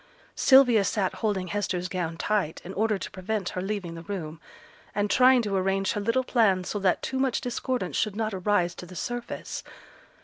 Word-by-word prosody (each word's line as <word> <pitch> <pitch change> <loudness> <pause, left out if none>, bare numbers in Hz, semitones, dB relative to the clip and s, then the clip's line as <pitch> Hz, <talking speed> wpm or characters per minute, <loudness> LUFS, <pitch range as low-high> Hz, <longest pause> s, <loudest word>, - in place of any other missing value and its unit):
Sylvia 250 -6 +6
sate 195 -1 0
holding 195 -4 -2
Hester's 185 -3 -1
gown 170 -3 -3
tight 195 -5 -1
in 185 - -6
order 215 +1 +1
to - - -7
prevent 195 0 -3
her 180 - -4
leaving 190 -3 -3
the 165 - -8
room, 165 -4 -6 0.5
and 205 0 0
trying 255 -1 +6
to 205 -2 -1
arrange 195 +1 +1
her 210 - -2
little 230 +5 +1
plans 200 -8 +2
so 205 - -2
that 190 -2 +1
too 265 - -2
much 265 -3 +1
discordance 245 - -2
should 215 -2 0
not 220 -1 -2
arise 185 -2 +1
to 180 - -10
the 185 - -11
surface. 240 +5 -5
200 Hz, 190 wpm, -27 LUFS, 185-225 Hz, 0.5 s, Sylvia